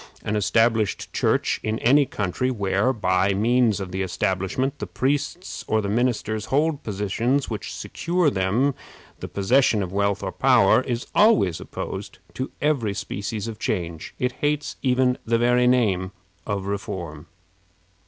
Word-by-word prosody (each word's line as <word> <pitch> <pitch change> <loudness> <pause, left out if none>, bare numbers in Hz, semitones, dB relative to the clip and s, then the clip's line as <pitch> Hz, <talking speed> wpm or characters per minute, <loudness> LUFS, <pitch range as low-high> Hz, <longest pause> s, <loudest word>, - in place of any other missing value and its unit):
An 105 - -2
established 110 +1 +1
Church - - +1
in 110 +1 -1
any 140 +5 +4
country, 100 +6 -2
where, 100 0 +1
by 95 -4 +1
means 115 0 +2
of 95 -2 -5
the 95 +1 -2
establishment, 95 +9 -1
the - - -4
priests 145 +7 -2
or 110 - +2
the 100 -2 -2
ministers 110 -2 0
hold 150 +1 +1
positions 115 +7 -1
which 105 -4 -4
secure 175 -2 0
to - - -6
them 105 +9 +1 0.5
the - - -6
possession 110 +1 +2
of 90 - -5
wealth 100 0 0
or - - -2
power, - - +4
is 120 -2 -3
always 205 - +4
opposed - - -6 0.2
to 130 - -4
every 125 -10 +1
species 100 +1 -4
of 110 -2 -7
change. 85 -5 -3
It 125 0 0
hates 150 0 0
even 125 -1 +2
the 115 0 +1
very 125 +1 +3
name 100 -7 +2 0.3
of 100 -2 -2
reform. 90 -6 -5
110 Hz, 150 wpm, -24 LUFS, 100-130 Hz, 0.5 s, any